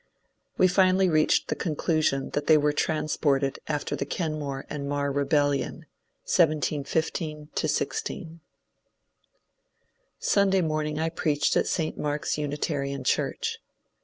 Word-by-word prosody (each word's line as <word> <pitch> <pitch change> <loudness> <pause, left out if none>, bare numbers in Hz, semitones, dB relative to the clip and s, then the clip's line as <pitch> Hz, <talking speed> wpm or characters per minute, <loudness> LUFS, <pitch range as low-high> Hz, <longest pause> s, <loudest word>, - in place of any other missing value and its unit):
We 185 - +6
finally 185 0 +4
reached 155 -2 +2
the - - 0
conclusion 155 -4 0
that 145 - -2
they 155 - +7
were 150 0 +2
transported 145 -3 0
after 150 -2 -2
the - - -2
Kenmore 145 -3 -3
and 140 -2 -5
Mar 140 0 0
Rebellion, 145 0 0 0.4
1715 155 0 0
16. 165 +1 -2 1.8
Sunday 195 -2 +3
morning 155 -2 -1
I 160 +1 0
preached 150 -3 0
at - - +2
St. 160 -3 -2
Mark's 150 0 -1
Unitarian 145 -2 -2
church. - - -1
150 Hz, 110 wpm, -26 LUFS, 145-160 Hz, 1.8 s, they